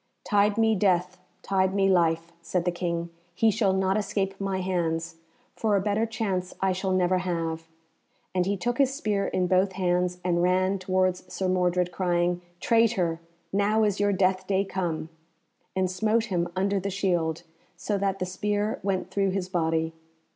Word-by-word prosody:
"Tide 205 0 +2
me 225 -1 +4
death, 185 -2 +1 0.2
tide 190 0 +1
me 195 -1 +3
life," 170 -2 +2
said 170 +1 -1
the 180 - +2
King, 170 -1 -3 0.2
"he 225 +3 +4
shall 210 -2 +2
not 190 +1 +1
escape 195 -1 -2
my 195 -1 -1
hands, 165 -3 -2 0.4
for 215 -2 +1
a - - +3
better 210 +3 0
chance 195 -5 -2
I 195 0 +2
shall 190 +1 -2
never 185 0 +2
have;" 165 -2 -3 0.7
and 180 -1 +1
he 200 0 0
took 240 +7 -2
his 270 -2 +4
spear 210 -8 -1
in 185 - 0
both 185 +1 +2
hands 180 -1 0
and 175 -1 +2
ran 185 +2 +2
towards 185 -1 0
Sir 190 - -2
Mordred, 180 -1 +1
crying, 175 -1 0 0.2
"Traitor! 210 -8 +2 0.3
now 210 +2 +2
is 205 -2 +1
your 205 0 +3
death 185 -1 +1
day 195 0 +1
come," 170 -5 -3 0.7
and 190 0 +2
smote 220 +4 +1
him 175 -1 +1
under 195 +1 +1
the 200 +1 -3
shield, 175 -4 0 0.3
so 200 +3 -2
that 195 -1 0
the 185 - -2
spear 205 +3 -1
went 190 -1 -2
through 195 -1 +1
his 185 -1 -2
body. 160 -2 0
185 Hz, 170 wpm, -26 LUFS, 180-200 Hz, 0.7 s, me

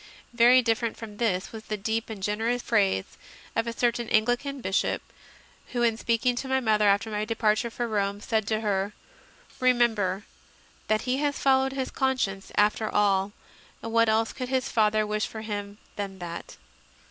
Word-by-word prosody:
Very 245 +2 +6
different 230 0 0
from 215 -2 -9
this 195 -5 0
was 220 -1 -9
the 215 - -3
deep 220 +3 -2
and 210 -4 -7
generous 225 +4 0
phrase 195 - +1 0.4
of 225 +1 0
a - - -1
certain 235 0 0
Anglican 245 +6 +1
Bishop, 190 -5 0 0.7
who, 240 -1 +1
in 230 -2 +3
speak 230 +1 -1
ing 250 -1 +3
to 265 - -3
my 265 0 +2
mother 215 -4 +2
after 200 +2 +2
my 210 0 -1
departure 215 +1 +1
for 240 +1 -3
Rome, 200 -2 -1
said 220 0 -1
to 220 0 0
her, 200 -1 -1 0.7
"Remember 225 -6 +2 0.6
that 215 0 +2
he 255 +1 0
has 290 0 0
followed 265 0 +3
his 265 -1 -3
conscience 255 -8 -1
after 210 +1 +2
all, 200 -1 +2 0.5
and 225 - -5
what 230 -1 +4
else 220 +1 +1
could 255 -1 -5
his 260 -1 0
father 215 -1 +2
wish 210 0 -1
for 220 - -7
him 205 -2 -5 0.2
than 200 -2 -4
that?" 170 -2 -7
220 Hz, 175 wpm, -27 LUFS, 205-240 Hz, 0.7 s, Very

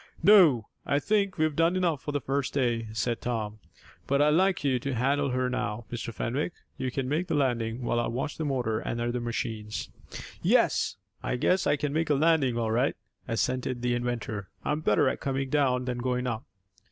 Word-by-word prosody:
"No, 165 - +6 0.2
I 140 - +1
think 200 +4 +1
we've 155 -2 +1
done 165 +3 +3
enough 170 -7 +1
for 145 - -4
the 145 - 0
first 135 0 -2
day," 120 -4 +1
said 115 +1 -1
Tom, 110 -3 -3 0.5
"But 140 0 +2
I'd 150 +1 +5
like 185 0 +2
you 130 -3 +2
to 135 +1 -3
handle 140 +4 +1
her 130 0 0
now, 120 -3 -3
Mr. 120 -1 -4
Fenwick. 135 +9 -2 0.2
You 130 - -2
can 130 +1 -2
make 155 +6 0
the 165 - 0
landing, 120 -4 0
while 120 0 +1
I 120 - 0
watch 130 +6 -3
the - - 0
motor 125 -7 0
and 120 - -3
other 120 +1 -1
machines." 110 -2 -4 0.5
"Yes. - - +2 0.2
I - - -1
guess 180 +9 +2
I 145 - +4
can 145 -1 -2
make 160 +1 0
a 145 - +4
landing 145 -5 +3
all 115 -2 0
right," 125 +5 +2 0.3
assented 125 +1 -1
the 125 0 +2
inventor. 120 -4 -3 0.2
"I'm 150 +1 0
better 145 - +3
at - - 0
coming 135 -1 -2
down 130 -4 +2
than 125 -1 -2
going 125 0 -1
up." 115 -3 -3
130 Hz, 200 wpm, -28 LUFS, 120-145 Hz, 0.5 s, No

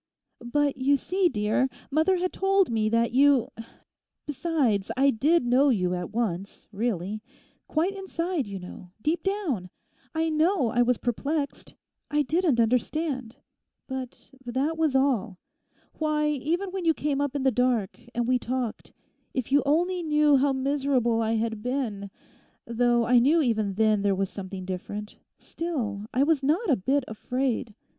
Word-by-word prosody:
'But 285 +3 0
you 275 +2 +3
see, 370 +5 +1
dear, 215 +3 +1 0.2
mother 320 +6 +3
had 365 +1 -2
told 390 -4 +2
me 215 -1 +1
that 230 +1 +2
you—besides, 265 - -1
I 275 +1 +5
did 290 +6 +2
know 260 +4 +4
you 180 -7 +1
at 180 -1 -3
once, 200 -4 -3
really; 210 -1 -2 0.5
quite 345 +6 0
inside, 355 - -3
you 200 -1 -5
know, 180 0 -10
deep 320 +3 0
down. 345 - -2 0.5
I 320 0 +1
know 315 - +2
I 245 - +2
was 245 0 +3
perplexed; 280 +4 -3 0.3
I 295 0 +2
didn't 310 -2 +1
understand; 255 +1 0 0.5
but 265 -1 -7
that 265 +6 -1
was 315 -4 +1
all. 245 -8 +1 0.6
Why, 305 -1 +1
even 325 +7 -1
when 380 -1 -4
you 325 -2 +3
came 285 -1 -1
up 285 -1 -2
in 280 - -1
the 265 - +4
dark, 245 -5 0 0.2
and 240 0 0
we 255 0 +2
talked—if 255 +1 -5
you 285 +1 +5
only 350 +5 +2
knew 300 -2 +3
how 280 +1 +2
miserable 265 -4 +1
I 225 0 0
had 225 -1 -1
been—though 235 0 -2
I 245 +1 +5
knew 290 +8 +4
even 215 -6 0
then 215 -1 +3
there 200 -1 +2
was 195 0 -2
something 190 -1 -7
different, 205 +3 -6 0.2
still 225 -12 -4
I 260 - +2
was 300 -1 +2
not 315 - +1
a - - +5
bit 270 +7 0
afraid. 245 0 -2
260 Hz, 150 wpm, -26 LUFS, 225-300 Hz, 0.6 s, I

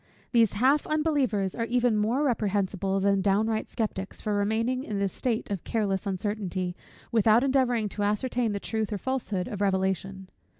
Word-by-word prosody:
These 230 -4 +4
half 265 +7 +3
unbelievers 280 - +1
are 230 - -2
even 245 -1 +2
more 225 +7 +1
reprehensible 200 -5 0
than 200 0 +2
downright 215 +3 +1
sceptics, 205 -4 -4
for 210 - -2
remaining 225 +5 0
in 210 -6 -4
this 200 -1 -1
state 230 -4 -2
of 195 -4 -3
careless 200 -3 -1
uncertainty, 190 -2 -2 0.4
without 225 +1 +4
endeavouring 255 -5 +2
to 205 - -5
ascertain 225 +3 0
the 200 - -2
truth 220 +1 -2
or 205 - -1
falsehood 215 -6 -2
of 205 -2 -5
revelation. 190 -1 -1
210 Hz, 160 wpm, -27 LUFS, 195-240 Hz, 0.4 s, These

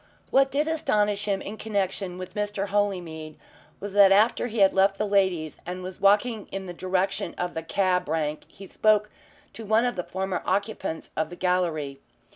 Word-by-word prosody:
What 270 0 +4
did 290 +3 0
astonish 210 -11 +1
him 195 -2 -1
in 210 +2 -7
connection 195 -3 -2
with 185 0 -8
Mr. 205 -1 -2
Holymead 175 -7 -2 0.4
was 205 0 -6
that 200 -1 +7
after 215 +4 +4
he 230 -1 -6
had 195 -2 +5
left 195 +1 +3
the 210 - 0
ladies 190 -6 +1
and 180 +1 -6
was 185 0 -8
walking 210 +2 +3
in 195 0 -5
the 180 - -6
direction 185 0 -1
of 180 0 -2
the 160 - -3
cab 180 0 0
rank 155 -1 -2
he 195 - -13
spoke 210 +1 +2 0.4
to 225 - -8
one 220 +3 +3
of 245 - -1
the 180 - -2
former 190 0 -3
occupants 200 -5 -2
of 160 0 -1
the 175 - -8
gallery. 170 -7 -1
195 Hz, 185 wpm, -26 LUFS, 180-210 Hz, 0.4 s, that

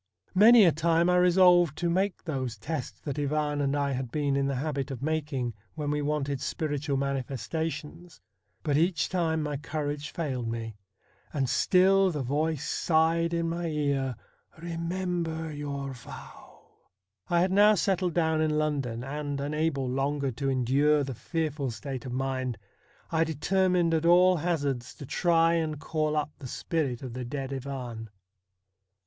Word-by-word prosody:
Many 215 +3 +8
a 170 - +6
time 165 +2 +2
I 180 - +4
resolved 180 -3 +5
to 175 - -1
make 185 +3 0
those 130 -8 -3
tests 145 +4 -5
that 145 -1 -4
Ivan 150 0 0
and 140 0 +1
I 140 -1 0
had 130 -2 -3
been 145 -2 0
in 140 0 +1
the 140 - -1
habit 140 0 -2
of 135 -1 -6
making 145 -6 -1 0.2
when 150 -2 -2
we 150 0 0
wanted 145 -2 -1
spiritual 145 -2 -2
manifestations, 150 +5 -4 0.4
but 145 -2 +1
each 170 0 +1
time 160 -4 0
my 150 -1 -2
courage 150 0 -4
failed 130 -8 -3
me, 115 -1 -4 0.6
and 135 -4 0
still 190 +8 +4
the 150 -6 -3
voice 150 +3 -1
sighed 165 +1 +2
in 170 0 0
my 170 +1 -2
ear, 140 -4 -1 0.2
' - - -31
Eemember 170 -1 -3
your 140 -2 -4
vow! 120 -2 -13 0.3
' 95 - -59 0.3
I 175 -1 +3
had 185 +1 +2
now 210 +2 +6
settled 185 -2 0
down 160 -2 +2
in 155 -1 +1
London, 140 -6 -1
and, 145 +1 -4
unable 145 -1 -1
longer 135 +1 -1
to 135 +4 -2
endure 140 +4 +3
the 135 -1 -4
fearful 150 0 -2
state 130 +3 -6
of - - -5
mind, 130 -2 -2 0.5
I 165 -1 +3
determined 175 +2 +1
at 165 +1 +1
all 180 +1 +6
hazards 145 -7 -2
to 140 - -9
try 165 +2 +3
and 160 -3 -1
call 155 0 -1
up 150 0 -1
the 135 - -7
spirit 135 -2 -2
of 125 -3 -6
the 125 +1 -4
dead 135 +2 -4
Ivan. 125 -4 -6
150 Hz, 160 wpm, -28 LUFS, 135-165 Hz, 0.6 s, Many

